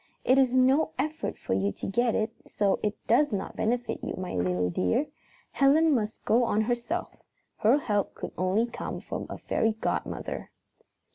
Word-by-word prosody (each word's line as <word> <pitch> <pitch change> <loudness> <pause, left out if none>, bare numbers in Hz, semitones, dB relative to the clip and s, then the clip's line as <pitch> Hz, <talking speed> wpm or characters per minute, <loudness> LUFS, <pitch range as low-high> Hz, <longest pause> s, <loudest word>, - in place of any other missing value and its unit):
It 260 +2 +5
is 260 -2 +4
no 260 +4 +3
effort 305 +4 -2
for - - -3
you 95 +1 +1
to - - -7
get 235 +4 +1
it, 220 +1 0 0.2
so 200 -2 +1
it 210 0 -1
does 290 +5 +3
not 195 -2 -3
benefit 235 0 -1
you, - - -3
my 185 -1 -5
little 90 0 0
dear. 90 - +1 0.5
Helen 300 +3 +4
must 215 -4 -2
go 240 +3 +4
on 220 -2 +2
herself. 240 +9 -2 0.4
Her 230 +6 +4
help 205 -8 -1
could - - -6
only 185 +5 +1
come 235 - -5
from - - -5
a - - -5
fairy 225 0 0
godmother." 220 - -3
225 Hz, 170 wpm, -28 LUFS, 205-260 Hz, 0.5 s, It